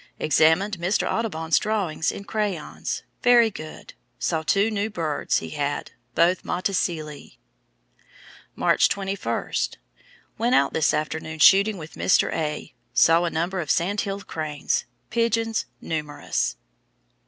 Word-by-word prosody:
Examined 160 +6 +3
Mr. 180 +4 +1
's - - -1
[Audubon's] 165 -8 0
drawings 200 -7 -1
in - - -8
crayons 200 -6 -3 0.2
very 240 -2 +5
good. 155 -4 -10 0.2
Saw 160 -2 -1
two 200 +7 +2
new 210 0 -1
birds 165 -8 -1
he - - -5
had, 145 -1 -3 0.2
both 175 +2 +3
Motacillae." 170 -5 -3 1.2
March - - +3
21. 195 0 -3 0.9
"Went 240 +3 +3
out 140 - +3
this 160 - +2
afternoon 160 +1 -3
shooting 200 +6 +6
with 160 -1 -9
Mr. - - +2
A. 150 -1 -3 0.2
Saw 165 +2 +5
a - - 0
number 175 +4 -2
of 155 -4 -4
Sandhill 195 +2 0
cranes. 155 -6 -2 0.3
Pigeons 230 -1 0
numerous." 150 - -2
175 Hz, 120 wpm, -24 LUFS, 155-205 Hz, 1.2 s, shooting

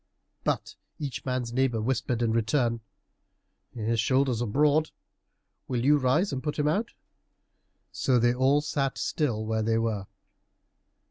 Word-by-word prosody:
But - - -2 0.2
each 135 -5 -5
man's 125 -2 -2
neighbor 130 -3 +1
whispered 120 0 -1
in 115 - +1
return, 115 +1 +1 1.0
"His 115 0 -1
shoulders 130 0 +2
are 120 - -1
broad; 150 +6 +3 0.8
will 125 -1 -1
you 150 +1 +6
rise 140 +9 +2
and 130 - -3
put 150 0 -3
him 150 -1 +1
out?" 205 +10 0 1.0
So 130 -2 +1
they 120 0 +3
all 135 +3 +3
sat 140 -2 -1
still 120 -8 -1
where 110 0 0
they 115 +1 +1
were. 110 -4 -1
125 Hz, 140 wpm, -27 LUFS, 115-145 Hz, 1.0 s, you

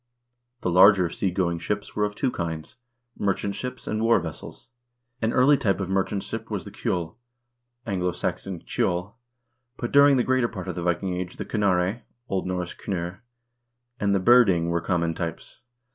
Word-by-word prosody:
The 90 - 0
larger 95 0 +6
sea 95 - -1
going 85 -2 -1
ships 105 +4 -4
were 105 - +2
of 105 0 -4
two 130 +3 0
kinds: 80 +3 -5 0.4
merchant 100 0 0
ships 125 +2 -6
and 110 - -2
war 115 -1 +4
vessels. 80 -3 -8 0.6
An 110 0 +1
early 140 +4 +5
type 100 -9 +1
of 95 -2 -3
merchant 95 +1 0
ship 115 0 -6
was 105 -4 -3
the 100 - -9
kjdll 90 -9 -2 0.7
(A. 115 - -4
S. 90 -2 -1
cedl), 90 +1 -2 0.6
but 120 - -4
during 140 -1 +6
the 125 - +3
greater 130 -1 +2
part 95 -5 -7
of 90 - -2
the 90 - -5
Viking 90 +2 0
Age 90 0 -5
the - - -4
knarre 100 +1 +1 0.3
(0. - - -16
N. - - -7
kndrr) 90 0 -4 0.8
and 100 -1 +2
the - - +3
byrding 95 -6 +5
were 85 0 0
common 85 -1 0
types. 85 -1 -6
95 Hz, 175 wpm, -25 LUFS, 90-110 Hz, 0.8 s, larger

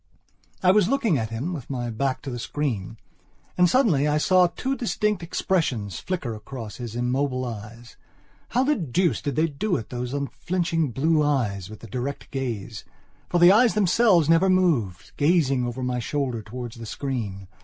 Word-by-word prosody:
I 185 - +6
was 200 -2 +4
looking 235 - +2
at 110 -1 -3
him, 125 +11 -3
with 140 -8 -7
my 120 -3 -3
back 130 +3 -2
to 140 - -5
the 120 - -5
screen. 115 -7 -3 0.6
And 180 -1 +4
suddenly, 180 - +3
I 150 0 +2
saw 180 +3 +4
two 260 +10 -3
distinct 210 -5 -1
expressions 140 - -1
flicker 170 -11 -3
across 110 0 -8
his 120 -2 -6
immobile 130 +1 0
eyes. 115 0 -9 0.5
How 250 - +2
the 295 +2 +2
deuce 175 - 0
did 140 -3 -3
they 160 - +3
do 180 +6 -1
it, 110 - -5
those 125 0 -4
unflinching 165 +2 -1
blue 150 +6 +2
eyes 115 -11 0
with 110 - -11
the 115 - -9
direct 130 +6 -5
gaze? 125 -7 -4 0.5
For 175 - +1
the 175 +1 +8
eyes 225 +3 +5
themselves 195 -4 +4
never 165 +4 +4
moved, 150 - +1
gazing 145 -5 +2
over 125 +2 -4
my 125 0 -1
shoulder 120 0 -2
towards 120 +2 -7
the 115 -1 -8
screen. 105 -9 -4
140 Hz, 175 wpm, -24 LUFS, 120-175 Hz, 0.6 s, the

